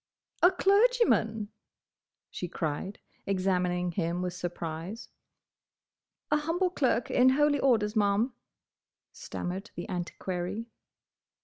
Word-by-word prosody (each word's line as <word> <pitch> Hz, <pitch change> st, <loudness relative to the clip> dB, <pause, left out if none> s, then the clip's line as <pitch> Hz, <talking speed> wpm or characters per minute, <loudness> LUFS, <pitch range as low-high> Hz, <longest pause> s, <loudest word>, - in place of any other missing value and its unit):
"A 355 Hz, -, +8 dB
clergyman!" 390 Hz, -, +3 dB, 0.8 s
she 180 Hz, -, -4 dB
cried, 170 Hz, +3 st, -3 dB, 0.3 s
examining 180 Hz, -2 st, 0 dB
him 170 Hz, +1 st, -1 dB
with 180 Hz, -1 st, -2 dB
surprise. 175 Hz, +3 st, -5 dB, 1.2 s
"A 295 Hz, -, +5 dB
humble 340 Hz, +4 st, 0 dB
clerk 250 Hz, -7 st, +1 dB
in 255 Hz, +1 st, +5 dB
holy 290 Hz, +2 st, +3 dB
orders, 225 Hz, -5 st, +2 dB
Ma'am," 210 Hz, +4 st, +2 dB, 0.8 s
stammered 190 Hz, +4 st, -5 dB
the 175 Hz, -, -5 dB
Antiquary. 180 Hz, +3 st, -4 dB
205 Hz, 95 wpm, -29 LUFS, 180-265 Hz, 1.2 s, A